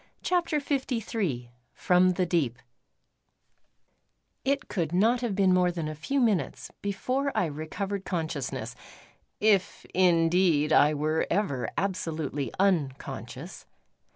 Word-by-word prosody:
CHAPTER 345 -4 +1
LIII 225 - -2 0.2
FROM 180 0 +3
THE 185 0 0
DEEP 155 -9 0 1.9
It 275 +2 0
could 170 -4 -2
not 230 +6 +3
have 235 -5 -1
been 190 -2 +4
more 180 -1 +3
than 165 -3 -4
a 155 - -4
few 275 - -2
minutes 220 -8 0
before 255 +8 -1
I 210 - +3
recovered 175 +6 -4
consciousness, 160 -7 -3 0.6
if 205 -3 +2
indeed 170 -3 +3
I 150 +1 +5
were 155 +2 0
ever 140 - 0
absolutely 160 - -2
unconscious. 165 -9 -2
180 Hz, 110 wpm, -28 LUFS, 155-210 Hz, 1.9 s, I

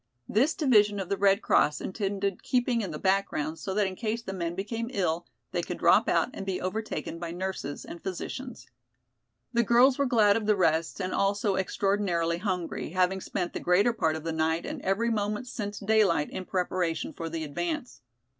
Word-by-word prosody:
This 270 +9 +2
division 210 -8 +4
of 190 - -4
the 200 - +1
Red 200 +1 +3
Cross 150 - +3
intended 200 -1 -2
keeping 245 -2 +1
in 195 - -3
the 155 - -5
background 175 -4 0
so 190 -2 -4
that 210 -1 +3
in 190 -1 -3
case 230 +2 -2
the 195 - -5
men 170 -2 -3
became 225 +4 -3
ill, 175 -7 -1 0.2
they - - 0
could - - -5
drop - - +4
out - - +2
and - - -6
be 190 -1 -2
overtaken 185 -3 -4
by 170 -1 -4
nurses 180 -4 -4
and 170 - -9
physicians. 245 +7 -6 0.9
The 235 - +4
girls 245 +4 +5
were 280 - +3
glad 215 -5 +4
of 215 -2 -3
the 210 - +4
rest 165 -2 +1
and 185 -1 -2
also 200 +1 +1
extraordinarily 190 -3 0
hungry, 180 -3 -3
having 185 +1 +2
spent 180 -1 -3
the - - -3
greater 200 +7 +3
part 160 -7 +1
of 160 - -6
the 165 0 -2
night 160 +1 0
and - - -5
every 215 +5 +1
moment 210 +1 -1
since 210 -4 -5
daylight 200 -7 +2
in 185 - -5
preparation 180 -3 -1
for 165 -1 -5
the 160 0 -4
advance. 300 - -4
195 Hz, 190 wpm, -28 LUFS, 175-215 Hz, 0.9 s, girls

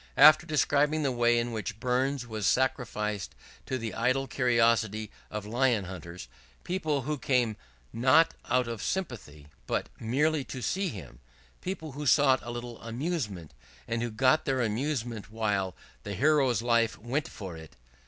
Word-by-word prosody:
After 155 +2 +8
describing 150 0 +2
the 135 - +1
way 120 -1 +3
in 120 0 0
which 110 -1 -4
Burns 130 +1 0
was 110 -4 -2
sacrificed 105 -6 0 0.3
to 130 - -1
the 115 -3 -4
idle 130 +3 +1
curiosity 115 -4 +2 0.2
of 105 -1 -5
Lion 120 -2 +1
hunters 85 -3 -8 0.4
people 155 -7 -1
who 150 +1 -2
came 125 -5 +1 0.4
not 130 +7 +4 0.2
out 125 0 +2
of 115 -2 -5
sympathy, 115 - -4 0.2
but - - -1
merely 145 +6 +1
to 130 - -7
see 195 +1 0
him 90 - -9 0.4
people 175 -5 -5
who 145 +2 -5
sought 135 -2 +5
a 120 - -8
little 120 -1 -6
amusement, 115 - -4 0.3
and 115 0 -1
who 120 - -1
got 130 +6 +3
their 130 -1 +1
amusement 115 -1 -2
while 105 -4 -1 0.3
"the 100 0 -5
Hero's 135 -1 +3
life 115 -1 +2
went 130 +9 -2
for 95 -5 -8
it!" 80 -2 -12
120 Hz, 155 wpm, -29 LUFS, 110-140 Hz, 0.4 s, After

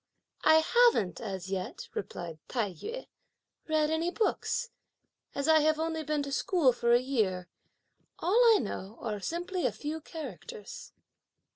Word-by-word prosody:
"I 315 0 +7
haven't 470 - +3
as 190 -4 -5
yet," 185 -1 -4
replied 170 -4 -6
Tai 215 -7 -1
yü, 470 - -6 0.6
"read 310 -1 +2
any 325 +2 +1
books, 465 +4 -1 0.6
as 280 +1 -1
I 315 -1 +6
have 310 0 +3
only 320 0 -1
been 300 -1 -1
to 280 - -5
school 285 -2 +3
for 235 0 +1
a 240 - +7
year; 215 -9 -1 0.7
all 415 +9 +3
I - - +5
know 200 0 -5
are 210 -3 -3
simply 350 - -2
a - - -1
few 310 +2 -5
characters." 260 - -8
290 Hz, 145 wpm, -30 LUFS, 210-325 Hz, 0.7 s, I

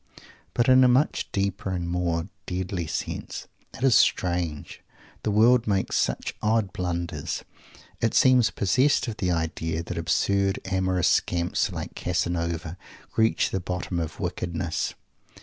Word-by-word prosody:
But 120 - +2
in 130 0 +7
a - - +7
much 130 +4 +2
deeper 100 0 -1
and 90 -2 -2
more 85 -1 -1 0.2
deadly 90 -2 -3
sense. - - -4 0.3
It - - -7
is 135 -3 +5
strange! 85 -7 +1 0.4
The - - -1
world 115 +3 +4
makes 100 -2 0
such - - 0
odd 105 -3 +1
blunders. 85 -1 -3 0.6
It 115 - +1
seems 125 -3 +5
possessed 130 +9 +2
of 110 -2 -4
the 90 - -1
idea 80 -1 -1
that - - -5
absurd 100 -1 +1
amorous 95 -2 +1
scamps 85 0 +1
like - - -6
Casanova 85 -1 -2 0.4
reach 110 0 +2
the 95 - -1
bottom 90 0 -3
of 80 -2 -5
wickedness. 85 -1 -2
95 Hz, 135 wpm, -26 LUFS, 85-110 Hz, 0.6 s, in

